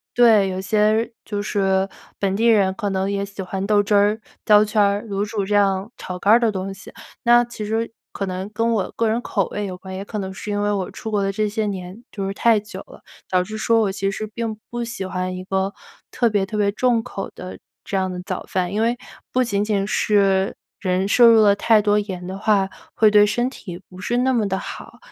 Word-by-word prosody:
有 - - -9
些 245 - +7
对， 210 -4 +6
有 185 - -3
些 215 +4 +1
就 205 -1 -4
是 195 -2 +1 0.3
本 195 -1 0
地 230 +3 +2
人 200 -4 +4
可 205 +1 -3
能 190 0 -1
也 200 0 -1
喜 200 0 -10
欢 190 +1 -4
豆 205 -1 +4
汁 205 +1 -1
儿、 205 +2 +3 0.3
焦 210 -1 +6
圈 215 0 +1
儿、 200 +1 +2
卤 200 -1 -1
煮 210 -1 -2
这 205 - -2
样， 195 0 +2
炒 180 -1 -6
肝 200 +4 +4
儿 235 - +7
的 230 -2 +2
东 195 0 -4
西。 195 - -12 0.3
那 240 0 +6
其 235 -2 -7
实 225 +2 -2 0.2
可 200 - -3
能 185 +1 -4
跟 230 +2 0
我 205 - -1
个 230 - +2
人 225 +2 0
口 200 -6 -1
味 205 -1 -3
有 185 - -6
关， 190 0 -9
也 190 - -5
可 210 +1 -6
能 190 -1 -4
是 210 - -8
因 205 - -1
为 205 - +1
我 195 -3 -2
出 220 -3 -7
国 205 - +1
的 195 0 0
这 215 +2 0
些 210 0 -2
年 190 +3 -6
就 195 -2 -4
是 195 - -3
太 225 +1 +3
久 215 +2 -9
了， - - -15 0.3
导 180 -1 +2
致 215 +3 -7
说 230 +1 +3
我 200 -3 +1
其 195 0 -1
实 205 +2 -4
并 225 -2 -3
不 240 0 -3
喜 235 -5 -5
欢 185 0 -3
一 185 - -6
个 190 +1 -1 0.4
特 240 - +1
别 205 -2 +2
特 210 - -4
别 205 -1 +2
重 235 +1 +1
口 195 - -6
的 185 - -8 0.2
这 - - -5
样 190 -1 0
的 180 - -5
早 - - -4
饭。 185 0 -1
因 215 - 0
为 235 +2 +1 0.3
不 255 0 +2
仅 205 -3 0
仅 205 -2 0
是 195 -2 +2 0.2
人 185 0 0
摄 235 +3 +6
入 225 -1 +7
了 200 -1 +5
太 220 +1 +4
多 210 0 +2
盐 190 -3 -5
的 190 +2 -6
话 200 -2 +2 0.3
会 215 -1 +5
对 210 0 +7
身 240 +4 +1
体 180 -8 -9
不 185 0 -13
是 240 +6 -1
那 260 +1 +2
么 225 -4 +1
地 190 -1 -1
好。 - - -8
205 Hz, 265 characters per minute, -21 LUFS, 195-220 Hz, 0.4 s, 些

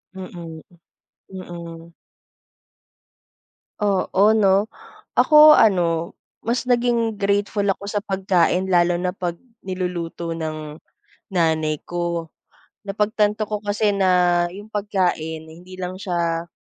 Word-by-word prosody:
Mm, 170 -4 -9 0.7
m 190 -1 -8
mm. 170 -1 -10 1.9
Oo, 205 +1 +2
'no. 200 -1 +3 0.5
Ako 305 0 +8
ano, 170 -5 +2 0.3
mas 235 +2 -1
naging 240 -2 +1
grateful 205 0 0
ako 200 0 -1
sa 205 0 -2
pagkain 190 -2 +1
lalo 175 -1 +2
na 180 +1 -2
'pag 175 -2 -4 0.2
niluluto 175 -3 -4
ng, 155 -2 -5 0.6
nanay 160 -4 +1
ko. 170 -2 -3 0.6
Napagtanto 210 +1 0
ko 210 -1 -3
kasi 210 0 0
na 180 -3 +3
'yong 205 +5 -11
pagkain, 180 -6 -1
eh, 160 - -13
hindi 185 +1 -12
lang 185 0 -6
siya, 170 -3 -2
185 Hz, 110 wpm, -22 LUFS, 170-205 Hz, 1.9 s, Ako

